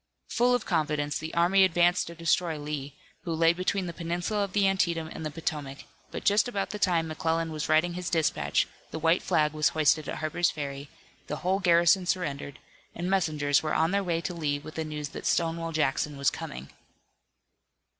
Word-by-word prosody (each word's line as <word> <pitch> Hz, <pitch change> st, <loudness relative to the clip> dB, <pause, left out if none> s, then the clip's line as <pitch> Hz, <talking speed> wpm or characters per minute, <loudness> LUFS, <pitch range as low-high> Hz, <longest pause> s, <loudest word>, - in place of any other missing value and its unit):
Full 245 Hz, +1 st, +3 dB
of 245 Hz, -, -2 dB
confidence, 150 Hz, -4 st, 0 dB
the 160 Hz, +1 st, -6 dB
army 180 Hz, +3 st, +5 dB
advanced 175 Hz, -1 st, +3 dB
to 170 Hz, -, -8 dB
destroy 165 Hz, 0 st, +1 dB
Lee, 145 Hz, -1 st, -5 dB, 0.3 s
who 170 Hz, -, -5 dB
lay 165 Hz, +1 st, +4 dB
between 185 Hz, +2 st, -1 dB
the 170 Hz, -, -5 dB
peninsula 175 Hz, +5 st, -2 dB
of 195 Hz, -2 st, -5 dB
the 200 Hz, -1 st, +3 dB
Antietam 170 Hz, -4 st, +1 dB
and -, -, -7 dB
the 155 Hz, -, -2 dB
Potomac, 150 Hz, -3 st, -4 dB, 0.3 s
but -, -, -6 dB
just 205 Hz, +3 st, +3 dB
about 200 Hz, -6 st, -2 dB
the 210 Hz, -, -5 dB
time 170 Hz, -4 st, +2 dB
McClellan 160 Hz, +1 st, -1 dB
was 155 Hz, 0 st, -4 dB
writing 160 Hz, +3 st, +3 dB
his 180 Hz, -1 st, -4 dB
dispatch, 160 Hz, -3 st, +1 dB, 0.2 s
the -, -, -5 dB
white 165 Hz, +2 st, +2 dB
flag 150 Hz, -1 st, +1 dB
was 155 Hz, 0 st, +2 dB
hoisted 155 Hz, -1 st, +2 dB
at -, -, -3 dB
Harper's 165 Hz, +2 st, 0 dB
Ferry, 140 Hz, -1 st, -6 dB, 0.4 s
the 150 Hz, -, -3 dB
whole 190 Hz, +2 st, +2 dB
garrison 175 Hz, 0 st, +4 dB
surrendered, 145 Hz, -7 st, -2 dB, 0.4 s
and 175 Hz, +2 st, -3 dB
messengers 150 Hz, -6 st, +2 dB
were 155 Hz, -, -2 dB
on 160 Hz, +2 st, +2 dB
their 200 Hz, 0 st, +1 dB
way 170 Hz, -2 st, -1 dB
to 180 Hz, -, -4 dB
Lee 150 Hz, -4 st, -1 dB
with 155 Hz, +2 st, -10 dB
the 160 Hz, -, -3 dB
news 150 Hz, -1 st, -5 dB
that -, -, -6 dB
Stonewall 165 Hz, 0 st, 0 dB
Jackson 150 Hz, -1 st, 0 dB
was 140 Hz, 0 st, +2 dB
coming. 65 Hz, +2 st, -7 dB
165 Hz, 195 wpm, -28 LUFS, 150-180 Hz, 0.4 s, army